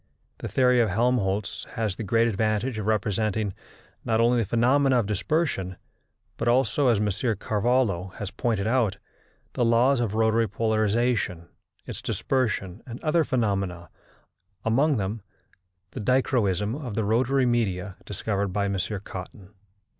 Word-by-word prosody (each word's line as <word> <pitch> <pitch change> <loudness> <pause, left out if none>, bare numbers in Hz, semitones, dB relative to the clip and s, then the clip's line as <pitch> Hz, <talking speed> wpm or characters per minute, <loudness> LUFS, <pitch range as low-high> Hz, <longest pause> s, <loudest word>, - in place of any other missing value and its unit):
The - - -4
theory 125 -1 +3
of 115 -3 +3
Helmholtz 105 -2 0
has 110 -5 -1
the - - -6
great 115 +3 +2
advantage 110 +2 0
of 105 - -4
representing, 105 -1 0 0.5
not 110 -1 +1
only 120 +1 +4
the 105 - -4
phenomena 130 +3 +3
of 120 - +2
dispersion, 105 - -1 0.6
but - - -2
also, 130 +3 +3
as 120 -3 +4
M. 105 - +1 0.3
Carvallo 105 -4 0
has 105 - -5
pointed 110 -5 -1
out, 115 -4 +1 0.6
the 125 - 0
laws 120 +3 +4
of 110 -3 -1
rotatory 110 0 +2
polarization, 110 -4 0 0.4
its - - -6
dispersion 110 -7 -1
and 120 0 -7
other 160 +1 +3
phenomena, 100 - -1 0.7
among 135 +6 +3
them 105 +2 -3 0.7
the - - -7
dichroism 110 -5 +1
of 130 -6 -5
the 110 - 0
rotatory 125 +5 +2
media 100 -6 0
discovered 100 0 -2
by 100 +1 -1
M. 100 -1 -1 0.3
Cotton. 95 +1 -9
110 Hz, 140 wpm, -26 LUFS, 100-125 Hz, 0.7 s, only